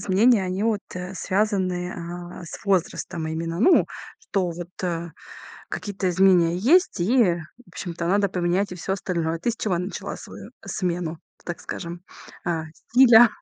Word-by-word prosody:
изменения, 205 +2 +4
они 185 +2 -2
вот, 220 -3 +1
э, 180 +1 -5
связаны, 185 -3 0
а, 175 +1 -7
с 170 - -9
возрастом 180 -3 0
именно, 165 +2 -3
ну, 355 +11 +6 0.3
что 185 -3 -1
вот, 170 +1 -7
э, 170 -2 -2 0.6
какие-то 200 -2 -3
изменения 180 -2 +4
есть, 305 - +3
и 210 -1 +4 0.3
в - - -21
общем-то 170 -2 -5
надо 200 +2 +3
поменять 180 +2 0
и - - -4
всё 190 +2 -3
остальное. 170 -4 -1
Ты 235 - 0
с 230 - -5
чего 195 -5 0
начала 180 +3 -4
свою - - -10
смену, 175 -3 -2 0.3
так 175 - -5
скажем, 175 0 -6 0.4
а, 165 -2 -1 0.3
стиля? 240 -2 +8
180 Hz, 150 wpm, -24 LUFS, 175-200 Hz, 0.6 s, стиля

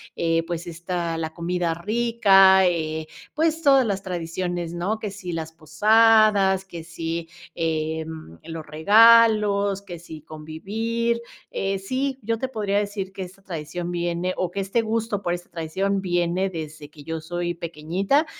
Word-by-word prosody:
Eh, 165 0 +1
pues, 170 0 -5
está 170 0 -3
la 160 -1 -4
comida 170 0 -1
rica 195 -1 +5
eh, 160 -2 -2 0.3
pues 320 +1 +1
todas 270 -3 +6
las 195 -2 -2
tradiciones, 175 -1 -3
¿no?, 195 +6 -2
que 210 - -4
si 190 -3 -7
las 160 -1 -4
posadas, 200 +3 +4
que 170 -3 -8
si, 165 0 -4 0.3
em, 160 - -3
los 165 -1 -7
regalos, 205 +3 +5
que 180 -3 -8
si 160 -3 -10
convivir. 220 +10 -3 0.3
Eh, 195 0 -2
sí, 260 +6 -2
yo 225 +2 -1
te 260 - -2
podría 210 -5 -1
decir 205 -2 -2
que 195 -1 -5
esta 185 +2 -12
tradición 170 -1 -5
viene 175 +1 -1
o 180 -2 -1
que 200 - -4
este 195 +4 0
gusto 220 -2 -2
por 175 - 0
esta 175 0 -6
tradición 190 +4 -2
viene 175 +1 0
desde 155 -3 -7
que 150 -1 -14
yo 160 +2 -4
soy 175 +1 -3
pequeñita 170 - 0
180 Hz, 155 wpm, -24 LUFS, 165-205 Hz, 0.3 s, todas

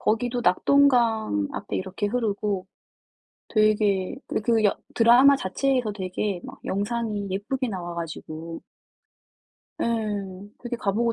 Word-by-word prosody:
거기도 240 +3 0
낙동강 225 - +3
앞에 - - -4
이렇게 190 +2 -3
흐르고 205 -4 -1 0.8
되게 210 -4 +2
그 - - -2
그 225 -1 +2
여 200 - +3 0.2
드라마 245 +4 +6
자체에서 250 +2 0
되게 190 -1 -3
막 - - -10
영상이 205 0 -2
예쁘게 235 +7 -2
나와 175 -4 -5
가지고 165 0 -6 1.2
예. - - +1 0.8
되게 240 0 -3
가 200 -3 -1
보고 230 +2 +1
215 Hz, 250 characters per minute, -25 LUFS, 190-235 Hz, 1.2 s, 드라마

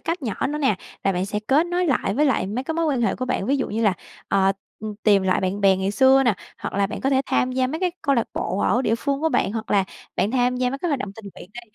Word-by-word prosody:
cách 335 -1 -3
nhỏ 220 -6 -2
nữa 300 +1 -3
nè, 265 -9 +2 0.3
là 195 - +3
bạn 180 +1 -1
sẽ 210 +1 -2
kết 295 +5 +3
nối 355 0 0
lại 250 -8 0
với 295 +5 +2
lại 265 -8 +1
mấy 235 +6 -3
cái 320 - -3
mối 330 0 0
quan 265 -5 0
hệ 230 - +1
của 255 - -3
bạn, 210 -5 -2
ví 280 - +2
dụ 265 - -2
như 225 +2 -1
là, 205 - +4 0.4
ờ, 195 -1 +3 0.3
ừm, 215 -1 -5
tìm 200 -3 +4
lại 185 -1 +1
bạn 190 +2 -2
bè 195 -1 +5
ngày 190 +1 -1
xưa 265 +5 +5
nè, 235 -6 +3 0.2
hoặc - - -5
là 200 0 +2
bạn 205 - -6
có 270 - 0
thể 265 -1 +3
tham 255 - +1
gia 255 0 +1
mấy 310 +6 -4
cái 365 -1 +1
câu 280 - +2
lạc 235 - +1
bộ 185 +3 -2
ở 245 +5 +2
địa 225 - +2
phương 280 +3 -2
của 320 - +2
bạn, 245 -8 0
hoặc 220 -1 -5
là 195 -2 +3 0.3
bạn 205 - +1
tham 250 0 +1
gia 250 0 0
mấy 275 - -4
cái 350 - -2
hoạt 285 -4 0
động 205 -5 -4
tình 225 - -11
nguyện 180 - -12
đi, 240 - -6
245 Hz, 310 wpm, -23 LUFS, 200-275 Hz, 0.4 s, bè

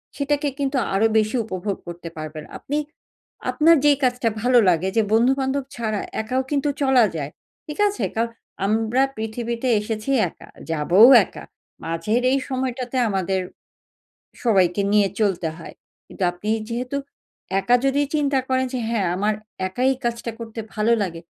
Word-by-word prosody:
সেটাকে 290 0 0
কিন্তু 275 -1 0 0.2
আরো 205 +3 +4
বেশি 215 +3 +1
উপভোগ 190 -1 -3
করতে 175 0 -7
পারবেন। 155 0 -6
আপনি 290 - -3 0.7
আপনার 330 +2 +5
যেই 290 -2 +5
কাজটা 245 -2 +2
ভালো 245 +1 +5
লাগে 180 +2 +1
যে - - +6
বন্ধু-বান্ধব 265 +3 +2
ছাড়া 215 -3 -2 0.2
একাও 255 +4 -1
কিন্তু 290 0 +1
চলা 265 -4 +5
যায়। 145 -2 -4 0.3
ঠিক 300 - -7
আছে? 410 - -4
কারণ 230 +1 0 0.4
আমরা 225 +4 +1 0.2
পৃথিবীতে 230 +3 -3
এসেছি 215 +3 -4 0.2
একা, - - -16 0.2
যাবও 165 +7 +5 0.2
একা। - - -11 0.4
মাঝের 165 +9 0
এই 275 - +2
সময়টাতে 255 -1 -3
আমাদের 190 -1 0 1.0
সবাইকে 195 -5 +3
নিয়ে 205 -1 +4
চলতে 185 -6 +1
হয়। - - -10 0.3
কিন্তু 195 - -9
আপনি 180 +4 -8 0.2
যেহেতু 250 +3 -3 0.6
একা 240 +6 +4
যদি 280 +2 +2
চিন্তা 285 -2 +2
করেন 260 0 +1
যে - - 0
হ্যাঁ 225 -5 0
আমার 210 +3 +1 0.3
একাই 250 +7 +1
কাজটা 235 0 -2
করতে 230 -1 -8 0.2
ভালো 220 +2 +2
লাগে। 170 -4 -4
230 Hz, 145 wpm, -22 LUFS, 195-260 Hz, 1.0 s, যে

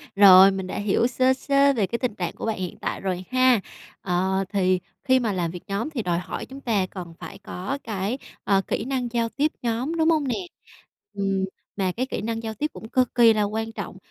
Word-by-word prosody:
Rồi, 195 -1 +9
mình 190 -1 -4
đã - - -5
hiểu 205 +3 +2
sơ 255 +1 +3
sơ 280 +1 +3
về 210 -6 0
cái 235 - -3
tình 240 -5 -2
trạng 175 -2 -3
của - - -5
bạn 225 - -1
hiện 180 -2 -5
tại - - -3
rồi 185 -1 -2
ha. 255 -3 +5 0.4
Ờ, 190 +1 0
thì 185 -2 +2 0.2
khi 260 0 +4
mà 225 -5 -1
làm 170 -3 -1
việc 180 - -9
nhóm 200 +9 -2
thì 270 -7 -3
đòi 175 -1 0
hỏi 180 - -5
chúng 275 +1 -11
ta 210 -7 +1
cần 180 -3 -8
phải 165 - -9
có 200 +10 -5
cái, 210 +3 -2 0.3
ờ, 195 -1 +3
kỹ - - -2
năng 260 -2 -1
giao 230 -1 0
tiếp 295 +5 0
nhóm, 245 +7 -1
đúng 320 0 +3
hông 305 -4 +2
nè? 245 - 0 0.8
Ừm, 195 -1 0 0.3
mà 190 -2 0
cái 250 +8 -2
kỹ 260 - -4
năng 225 +1 -3
giao 220 - -3
tiếp 295 +8 -1
cũng 220 - -10
cực 255 -1 +1
kỳ 230 -2 +7
là 210 -1 +1
quan 220 +2 -2
trọng, 200 -4 -7
220 Hz, 230 wpm, -24 LUFS, 190-255 Hz, 0.8 s, Rồi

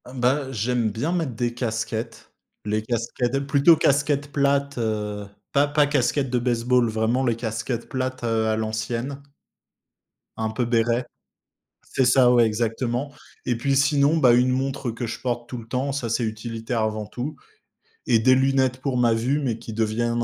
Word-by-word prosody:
Ben, 130 +2 +1
j'aime 120 0 0
bien 140 - -2
mettre 160 -10 -1
des 120 -1 -1
casquettes, 115 -1 -4 0.3
les 105 +1 0
casquettes, 120 +3 -2
plutôt 145 +3 +5
casquettes 145 0 +1
plates, 140 -1 +1
heu, 105 -2 -2 0.2
pas 145 0 +3
pas 145 0 +3
casquettes 135 -1 0
de 125 - +2
base-ball, 120 0 +2
vraiment 110 +4 0
les 120 -3 +1
casquettes 115 +1 -4
plates, 130 -2 -3
heu, 110 -1 +1
à 110 - +1
l'ancienne 115 +5 -3 1.2
un 110 0 -1
peu 120 +2 -1
béret. 120 +1 +1 0.8
C'est 130 - 0
ça, 125 0 +5
ouais, 120 -2 +5
exactement 120 +5 -2 0.3
et 120 - +2
puis, 135 +3 0
sinon, 145 +2 +3
bah, 125 -5 +5
une 125 +1 +3
montre 135 -1 -2
que 115 +1 -5
je - - -5
porte 120 -1 -3
tout 125 - -5
le 115 -1 -10
temps. 130 +3 -1
Ça, 120 -5 -3
c'est 115 +1 0
utilitaire 115 +1 -3
avant 110 -1 -2
tout 130 +7 -5 0.7
et 115 -3 +4
des 130 +3 +5
lunettes 130 -1 +1
pour 130 -2 -1
ma 120 -2 +3
vue 125 +6 0
mais 120 -5 -2
qui 110 - -8
deviennent 115 +2 0
120 Hz, 170 wpm, -24 LUFS, 115-135 Hz, 1.2 s, plutôt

